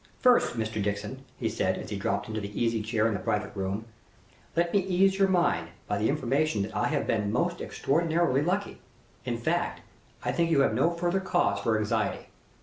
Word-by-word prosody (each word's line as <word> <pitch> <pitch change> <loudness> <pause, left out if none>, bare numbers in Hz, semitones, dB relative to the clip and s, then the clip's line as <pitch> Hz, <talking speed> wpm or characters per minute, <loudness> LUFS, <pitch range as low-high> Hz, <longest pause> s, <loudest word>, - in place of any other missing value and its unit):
"First, 250 - +4
Mr. 110 -1 -2
Dixon," 105 +6 -3
he - - -1
said, - - 0
as - - -7
he - - -1
dropped - - -1
into 110 0 -3
an 100 - -4
easy 115 +2 0
chair 110 0 0
in 115 - +2
the 100 - -2
private 105 +3 -2
room, 100 +3 -3 0.7
"let 170 +1 +1
me 200 - +5
ease 190 +1 +2
your 195 - +5
mind 175 - +2 0.2
by 105 -1 -1
the 110 - +2
information 140 -4 +1
that 110 +2 -6
I - - +1
have 145 -2 0
been 105 -2 0
most 175 +8 0
extraordinarily 160 -2 +1
lucky; 190 +6 -1 0.4
in 120 -2 -1
fact, 170 +8 -1 0.4
I - - 0
think 170 -1 +1
you 150 -4 +4
have 135 - +3
no 130 +9 +3
further 175 +2 0
cause 185 -2 +1
for 110 -1 +1
anxiety. 110 -1 -1
130 Hz, 200 wpm, -28 LUFS, 110-175 Hz, 0.7 s, me